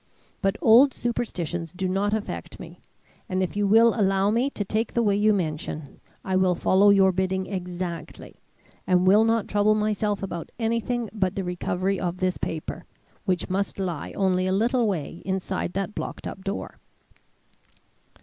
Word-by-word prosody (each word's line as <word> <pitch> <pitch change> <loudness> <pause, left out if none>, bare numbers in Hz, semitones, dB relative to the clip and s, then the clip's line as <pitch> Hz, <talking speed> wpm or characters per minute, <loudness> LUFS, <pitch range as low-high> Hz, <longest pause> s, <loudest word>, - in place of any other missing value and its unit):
But 195 0 +1
old 245 +4 +6
superstitions 175 -8 -3
do 185 +1 -2
not 195 +3 0
affect 215 -1 -4
me, - - -11 0.5
and 185 0 0
if 185 - -4
you 205 -1 +1
will 225 +3 +6
allow 195 -1 +2
me 240 +5 +1
to 205 -7 -4
take 215 +3 -2
the 235 - +3
way 205 -2 +2
you 210 +1 +3
mention, 155 -5 -3 0.3
I 190 -1 +1
will 185 -1 +3
follow 195 +4 +4
your 195 -1 +5
bidding 190 +1 -1
exactly, 180 -2 -6 0.5
and 180 0 +3
will 205 +4 +6
not 225 -1 +1
trouble 210 +1 +3
myself 210 -1 -1
about 175 -4 -5
anything 230 +1 -1
but 190 -4 -1
the 195 - -2
recovery 180 +2 -1
of 180 0 -2
this 185 0 -1
paper, 160 -1 -5 0.4
which 185 -3 0
must 195 +2 -2
lie 175 -6 -3
only 185 -1 +1
a - - 0
little 235 +4 +2
way 170 -3 -3
inside 190 -2 -2
that 195 +2 -3
blocked - - -6
up 190 - -7
door." 195 +1 -5
195 Hz, 165 wpm, -25 LUFS, 185-215 Hz, 0.5 s, old